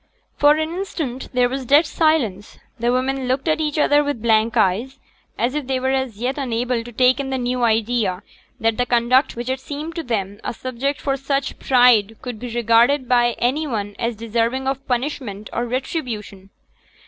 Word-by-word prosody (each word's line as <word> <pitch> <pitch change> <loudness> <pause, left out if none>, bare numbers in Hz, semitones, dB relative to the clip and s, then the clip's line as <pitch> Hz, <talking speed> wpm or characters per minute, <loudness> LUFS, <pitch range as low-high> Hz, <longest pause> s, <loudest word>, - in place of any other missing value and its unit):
For 290 0 +5
an 315 +1 -2
instant 315 -9 -4
there 250 -1 +3
was 265 +2 -4
dead 285 +6 +5
silence. 280 - 0 0.2
The 240 +1 +1
women 260 +1 -1
looked 260 +4 -1
at 315 0 +1
each 300 0 -1
other 295 0 +4
with 285 -4 -2
blank 225 0 +2
eyes, 225 +7 +1 0.4
as 245 +2 0
if 295 -3 -3
they 265 -1 0
were 260 +1 0
as 265 -5 -1
yet 255 +5 -2
unable 245 -2 -1
to 240 - -10
take 255 +3 +3
in 275 -1 -3
the 265 - -1
new 250 0 -1
idea 220 -4 +1 0.4
that 225 0 +1
the 245 0 0
conduct 245 +3 +3
which 240 +1 -5
had 260 0 -1
seemed 295 +4 -6
to 330 - -3
them 205 -7 -3
a - - -4
subject 260 +4 -3
for 275 -1 -1
such 275 0 -1
just - - -14
pride 245 -4 +4
could 245 -4 -6
be 250 - -6
regarded 240 +4 +3
by 240 -1 +3
any 290 +6 0
one 205 -5 -3
as 235 -1 -1
deserving 230 +4 -1
of 270 0 -3
punishment 245 -5 -3
or 240 +1 -1
retribution. 230 - -4
250 Hz, 195 wpm, -21 LUFS, 230-270 Hz, 0.4 s, For